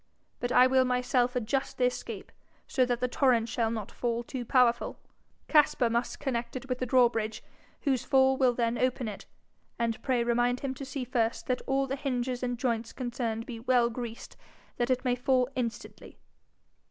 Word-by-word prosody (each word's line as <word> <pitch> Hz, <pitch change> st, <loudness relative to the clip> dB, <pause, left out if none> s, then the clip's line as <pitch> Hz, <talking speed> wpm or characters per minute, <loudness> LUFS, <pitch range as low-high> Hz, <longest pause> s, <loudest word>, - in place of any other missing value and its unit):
But 245 Hz, -, -2 dB
I 250 Hz, -, +7 dB
will 260 Hz, 0 st, +4 dB
myself 250 Hz, 0 st, +1 dB
adjust 250 Hz, +3 st, -1 dB
the 255 Hz, -, 0 dB
escape, 250 Hz, -, -4 dB, 0.3 s
so 255 Hz, -, +2 dB
that 245 Hz, -1 st, -1 dB
the 250 Hz, -, +2 dB
torrent 245 Hz, -3 st, +2 dB
shall 230 Hz, -1 st, 0 dB
not 220 Hz, -3 st, -4 dB
fall 235 Hz, -1 st, -2 dB
too 250 Hz, +1 st, -5 dB
powerful; 245 Hz, 0 st, +2 dB, 0.5 s
Caspar 285 Hz, -6 st, +4 dB
must 235 Hz, +1 st, -1 dB
connect 250 Hz, -5 st, -3 dB
it 255 Hz, +1 st, -6 dB
with 255 Hz, -1 st, -2 dB
the 255 Hz, -, -2 dB
drawbridge, 235 Hz, -3 st, +2 dB, 0.4 s
whose 265 Hz, -5 st, +1 dB
fall 265 Hz, -1 st, +4 dB
will 260 Hz, -2 st, +3 dB
then 235 Hz, 0 st, 0 dB
open 255 Hz, -1 st, 0 dB
it. 205 Hz, -2 st, -7 dB, 0.5 s
And 230 Hz, -1 st, -1 dB
pray 255 Hz, -3 st, +1 dB
remind 240 Hz, +1 st, +1 dB
him 275 Hz, -2 st, -2 dB
to 270 Hz, +1 st, -7 dB
see 270 Hz, 0 st, -4 dB
first 235 Hz, -2 st, -1 dB
that 250 Hz, -1 st, -1 dB
all 270 Hz, 0 st, +2 dB
the 270 Hz, 0 st, -3 dB
hinges 255 Hz, -2 st, -2 dB
and 245 Hz, -1 st, -2 dB
joints 230 Hz, -2 st, -2 dB
concerned 235 Hz, -3 st, -3 dB
be 230 Hz, -2 st, -7 dB
well 240 Hz, 0 st, +2 dB
greased, 235 Hz, -1 st, -7 dB, 0.4 s
that 240 Hz, +1 st, 0 dB
it 255 Hz, +1 st, 0 dB
may 250 Hz, -, +3 dB
fall 250 Hz, 0 st, +2 dB
instantly.' 235 Hz, -3 st, -5 dB
245 Hz, 180 wpm, -29 LUFS, 235-260 Hz, 0.5 s, I